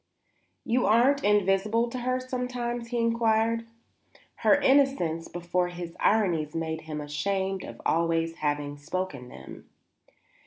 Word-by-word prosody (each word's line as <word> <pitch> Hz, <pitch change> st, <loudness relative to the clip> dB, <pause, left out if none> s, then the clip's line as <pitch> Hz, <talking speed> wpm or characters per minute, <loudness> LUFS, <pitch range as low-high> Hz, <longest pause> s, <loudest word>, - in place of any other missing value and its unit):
"You 245 Hz, +2 st, +1 dB
aren't 260 Hz, +6 st, +4 dB
invisible 210 Hz, +3 st, +2 dB
to 255 Hz, -, -4 dB
her 255 Hz, +1 st, 0 dB
sometimes?" 250 Hz, -2 st, -3 dB
he 240 Hz, +1 st, -3 dB
inquired. 230 Hz, 0 st, +1 dB, 0.7 s
Her -, -, +4 dB
innocence 265 Hz, -, +2 dB
before 175 Hz, +1 st, -1 dB
his 175 Hz, -1 st, -7 dB
ironies 170 Hz, -9 st, +1 dB
made 160 Hz, -1 st, -3 dB
him 155 Hz, -1 st, -6 dB
ashamed 190 Hz, +6 st, -2 dB, 0.2 s
always 165 Hz, 0 st, +1 dB
of 165 Hz, -, -18 dB
having 145 Hz, -1 st, -2 dB
spoken 145 Hz, -4 st, -4 dB
them. -, -, -12 dB
195 Hz, 120 wpm, -27 LUFS, 165-235 Hz, 0.7 s, aren't